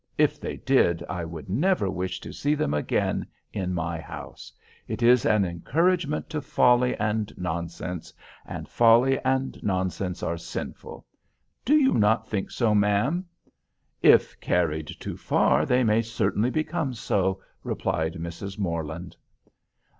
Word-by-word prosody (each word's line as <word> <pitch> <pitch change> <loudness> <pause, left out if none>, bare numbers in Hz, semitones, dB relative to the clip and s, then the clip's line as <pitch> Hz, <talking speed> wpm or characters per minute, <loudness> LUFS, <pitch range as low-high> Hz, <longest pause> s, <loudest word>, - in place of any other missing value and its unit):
If - - +2
they - - -4
did 85 -1 +2
I 90 -2 -3
would 80 -2 -7
never 145 - +1
wish 95 -1 -3
to - - -8
see 145 +1 0
them 75 - -1
again 75 - 0 0.3
in 90 -2 -2
my 85 -1 -2
house. 80 - -9 0.4
It - - -3
is 125 0 +5
an 105 -2 +3
encouragement 150 - 0
to 155 -2 -2
folly 125 -2 +3
and 105 0 -1
nonsense—and 85 0 -6
folly 120 +3 +4
and 130 0 -1
nonsense 95 -1 -2
are 85 0 -2
sinful. 85 - -7 0.6
Do 285 0 +4
not 110 +2 +3
you - - -27
think 100 -3 -2
so, 115 -4 +1
ma'am?" 105 - +2 0.7
"If - - +5
carried 80 -3 0
too - - -7
far 65 +4 +2
they 125 0 +3
may 110 0 +3
certainly 115 0 0
become 155 -2 -2
so," 95 -3 0 0.2
replied 80 0 -1
Mrs. 85 +4 -6
Morland. 85 -2 -4
100 Hz, 135 wpm, -26 LUFS, 85-125 Hz, 0.7 s, is